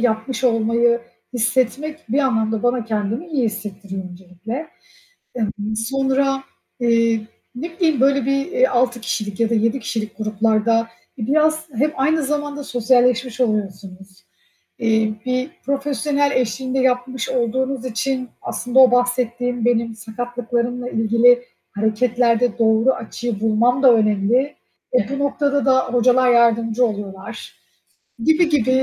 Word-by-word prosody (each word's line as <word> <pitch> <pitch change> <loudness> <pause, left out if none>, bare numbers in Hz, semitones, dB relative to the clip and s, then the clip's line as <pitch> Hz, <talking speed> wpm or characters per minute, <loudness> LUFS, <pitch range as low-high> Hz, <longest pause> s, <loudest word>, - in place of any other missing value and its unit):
yapmış 235 +2 -1
olmayı 235 0 +2 0.3
hissetmek 260 +6 0
bir 255 +6 0
anlamda 220 -5 0
bana 245 -1 +1
kendimi 220 - -2
iyi 275 -5 0
hissettiriyor 200 -3 -5
öncelikle. 190 - -7 0.7
Emm, 215 -2 -3
sonra, 270 +3 0 0.4
eee, 230 -2 +2 0.3
ne 330 +7 -5
bileyim, 315 -6 +2
böyle 275 -1 +3
bir, 275 +1 0
eee, - - +2
6 245 - 0
kişilik 210 -2 -3
ya 230 -1 +2
da 230 - 0
7 230 +4 +1
kişilik 220 -2 -4
gruplarda 220 +1 +1 0.3
biraz 310 +6 +1
hem 285 +7 +1
aynı 305 +4 +1
zamanda 290 0 -3
sosyalleşmiş 250 0 +1
oluyorsunuz. 195 -4 -4 0.6
Eee, 220 -1 +1
bir 255 +2 -1 0.2
profesyonel 280 +1 0
eşliğinde 255 +1 -1
yapmış 255 -1 0
olduğunuz 260 +1 -1
için 255 +1 -2
aslında 245 +1 -1
o 260 -2 +8
bahsettiğim, 245 -1 0
benim 230 -1 +1
sakatlıklarımla 245 +2 -3
ilgili 235 +2 +3 0.3
hareketlerde 230 +2 +1
doğru 225 +3 +4
açıyı 230 -1 -5
bulmam 230 +4 +2
da 255 -3 +8
önemli. 220 +5 +1 0.4
E, 250 -5 +2
bu 275 0 -3
noktada 280 0 0
da 260 -1 +4
hocalar 250 +1 +4
yardımcı 230 0 +3
oluyorlar, 200 -3 -7 0.7
gibi 320 +4 +3
gibi. 280 -6 +1
245 Hz, 125 wpm, -20 LUFS, 220-265 Hz, 0.7 s, o